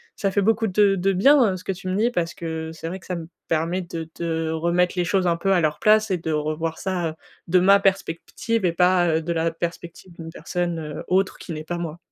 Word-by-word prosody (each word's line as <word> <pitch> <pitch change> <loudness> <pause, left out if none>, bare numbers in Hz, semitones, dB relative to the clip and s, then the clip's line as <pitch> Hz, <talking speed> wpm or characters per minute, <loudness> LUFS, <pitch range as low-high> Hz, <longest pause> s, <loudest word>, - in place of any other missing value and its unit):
ça 195 - -1
fait 200 - +1
beaucoup 225 +2 +2
de 200 0 +3
de 195 +1 +1
bien 225 -1 +4
ce 180 - -12
que - - -2
tu 185 0 -7
me 185 - -1
dis 220 +4 +2
parce 175 -7 -1
que 160 -1 -5
c'est 165 0 -7
vrai 180 +3 -4
que - - -18
ça 180 - -3
me 165 -2 -6 0.2
permet 165 +3 0
de 165 -2 -6
de 165 -1 -1
remettre 170 +2 +1
les 175 - +1
choses 185 +1 +1
un 170 -1 +2
peu 195 +3 +1
à 180 - +3
leur 150 -1 0
place 215 0 +4
et 185 - +2
de 160 -1 -4
revoir 155 +2 -2
ça, 175 -4 -2 0.3
de 180 +2 +4
ma 195 +2 +6
perspective 195 +3 -1
et 175 - +3
pas, 180 0 +3
heu, - - -2
de 165 +2 -3
la 165 0 0
perspective 170 +2 -6
d'une 165 -1 -9
personne 165 -4 -4
autre, 190 +1 +1
qui 170 - -7
n'est 155 0 -6
pas 175 +2 -4
moi. 170 -1 -5
175 Hz, 245 wpm, -23 LUFS, 165-190 Hz, 0.3 s, ma